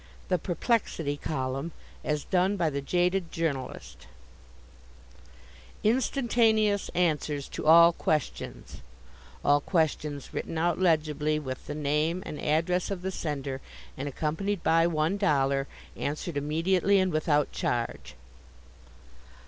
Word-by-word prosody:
The 180 Hz, -2 st, +2 dB
Perplexity 175 Hz, -, -1 dB
Column 135 Hz, +1 st, -3 dB, 0.3 s
as 150 Hz, -1 st, -1 dB
Done 190 Hz, +2 st, +1 dB
by 165 Hz, -4 st, +1 dB
the 140 Hz, 0 st, -2 dB
Jaded 180 Hz, +3 st, 0 dB
Journalist 140 Hz, -6 st, -4 dB, 1.8 s
INSTANTANEOUS 225 Hz, -3 st, +2 dB
ANSWERS 150 Hz, -4 st, 0 dB
TO -, -, -5 dB
ALL 170 Hz, +1 st, +8 dB
QUESTIONS 155 Hz, -, -3 dB, 0.6 s
(All 145 Hz, 0 st, +4 dB
questions 150 Hz, -4 st, -1 dB
written 165 Hz, -, -4 dB
out 170 Hz, +1 st, +1 dB
legibly 155 Hz, -3 st, +2 dB
with 130 Hz, -4 st, -6 dB
the -, -, -4 dB
name 155 Hz, +4 st, 0 dB
and 150 Hz, -, -6 dB
address 170 Hz, +4 st, +1 dB
of 190 Hz, -3 st, -4 dB
the 190 Hz, -, -2 dB
sender 140 Hz, -6 st, -4 dB, 0.3 s
and 135 Hz, +2 st, -4 dB
accompanied 165 Hz, +7 st, -2 dB
by 165 Hz, +1 st, +4 dB
one 160 Hz, +3 st, 0 dB
dollar, 140 Hz, -7 st, +1 dB, 0.3 s
answered 150 Hz, +3 st, -3 dB
immediately 170 Hz, +7 st, +2 dB
and 185 Hz, -1 st, +2 dB
without 150 Hz, -2 st, +1 dB
charge.) 120 Hz, -1 st, -3 dB
160 Hz, 115 wpm, -28 LUFS, 145-180 Hz, 1.8 s, ALL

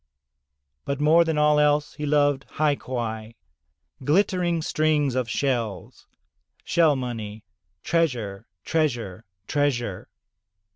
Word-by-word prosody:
But 140 Hz, 0 st, -3 dB
more 160 Hz, +3 st, +5 dB
than 160 Hz, -2 st, -1 dB
all 150 Hz, 0 st, +4 dB
else 150 Hz, 0 st, +2 dB
he 150 Hz, -, -5 dB
loved 145 Hz, -2 st, +2 dB
hai 150 Hz, -1 st, +1 dB
quai 115 Hz, -4 st, -5 dB, 0.3 s
— 65 Hz, -, -23 dB
glittering 175 Hz, +1 st, +1 dB
strings 155 Hz, -4 st, +1 dB
of 125 Hz, -2 st, -1 dB
shells 120 Hz, -7 st, -3 dB, 0.3 s
— -, -, -41 dB
^shell 160 Hz, -4 st, +3 dB
money 110 Hz, -4 st, -5 dB, 0.2 s
— -, -, -50 dB
treasure, 125 Hz, -13 st, -1 dB, 0.2 s
treasure, 120 Hz, -, -1 dB, 0.2 s
treasure. 120 Hz, -8 st, -1 dB
140 Hz, 115 wpm, -24 LUFS, 115-150 Hz, 0.3 s, more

